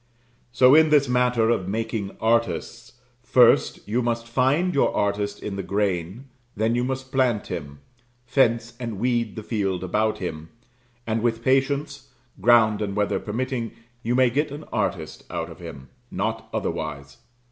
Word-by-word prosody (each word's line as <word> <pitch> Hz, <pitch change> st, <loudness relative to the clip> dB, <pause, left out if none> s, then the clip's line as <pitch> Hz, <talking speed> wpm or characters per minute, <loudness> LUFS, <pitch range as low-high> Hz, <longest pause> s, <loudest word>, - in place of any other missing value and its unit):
So 125 Hz, +2 st, +6 dB
in 160 Hz, +1 st, +6 dB
this 145 Hz, -2 st, +4 dB
matter 125 Hz, -2 st, +2 dB
of 95 Hz, -6 st, -1 dB
making 110 Hz, -1 st, -3 dB
artists 115 Hz, +1 st, -1 dB, 0.3 s
first 120 Hz, -3 st, +3 dB
you 115 Hz, +4 st, 0 dB
must 115 Hz, -1 st, -1 dB
find 135 Hz, +9 st, +1 dB
your 140 Hz, -, +2 dB
artist 100 Hz, 0 st, -1 dB
in 100 Hz, -2 st, -4 dB
the -, -, -2 dB
grain; 100 Hz, +3 st, -2 dB, 0.3 s
then 110 Hz, +2 st, +1 dB
you 120 Hz, +1 st, +1 dB
must 130 Hz, 0 st, -4 dB
plant 125 Hz, -5 st, +1 dB
him; 70 Hz, -3 st, -7 dB, 0.4 s
fence 120 Hz, -2 st, +1 dB
and 115 Hz, -4 st, -4 dB
weed 120 Hz, -1 st, 0 dB
the 110 Hz, -, -6 dB
field 95 Hz, -5 st, -2 dB
about 110 Hz, +4 st, 0 dB
him; 80 Hz, -4 st, -6 dB, 0.6 s
and 110 Hz, 0 st, -1 dB
with 115 Hz, -1 st, -1 dB
patience, 140 Hz, +2 st, 0 dB, 0.3 s
ground 110 Hz, -1 st, +4 dB
and 100 Hz, -2 st, -2 dB
weather 105 Hz, -1 st, 0 dB
permitting, 120 Hz, +1 st, -3 dB, 0.3 s
you 120 Hz, +1 st, -1 dB
may 130 Hz, -1 st, +4 dB
get 150 Hz, +5 st, 0 dB
an 145 Hz, +2 st, -8 dB
artist -, -, -2 dB
out -, -, -4 dB
of -, -, -12 dB
him 65 Hz, -1 st, -10 dB, 0.2 s
not -, -, -3 dB
otherwise. 70 Hz, -1 st, -4 dB
115 Hz, 155 wpm, -24 LUFS, 105-125 Hz, 0.6 s, So